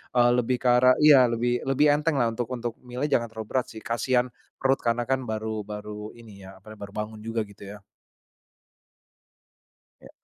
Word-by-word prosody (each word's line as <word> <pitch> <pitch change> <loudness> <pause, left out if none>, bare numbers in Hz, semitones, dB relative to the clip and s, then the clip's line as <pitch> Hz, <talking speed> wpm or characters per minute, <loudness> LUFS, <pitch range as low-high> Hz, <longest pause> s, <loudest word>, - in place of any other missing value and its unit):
eee, 120 0 +5
lebih 125 +1 +1
ke - - +1
arah 125 +1 +5
iya 135 -5 +7
lebih 120 +1 0
lebih 145 +2 +4
enteng 150 +2 +1
lah 120 -4 +1
untuk 115 +1 -3
untuk 120 -2 -4
milih 125 +3 -4
jangan 115 -1 +2
terlalu 110 -1 -8
berat 130 -2 0
sih 110 - -10
kasihan, 125 +1 0 0.2
perut 135 0 +1
karena 120 +1 0
kan 130 +1 0
baru 110 0 -3
baru 105 +1 -7
ini 105 -5 -13
ya 95 - -12
apa, 110 - -12
baru 100 0 -9
bangun 105 0 -5
juga 115 +1 -3
gitu 100 -1 -13
ya. - - -13 2.2
Ya. - - -14
120 Hz, 180 wpm, -26 LUFS, 110-125 Hz, 2.2 s, iya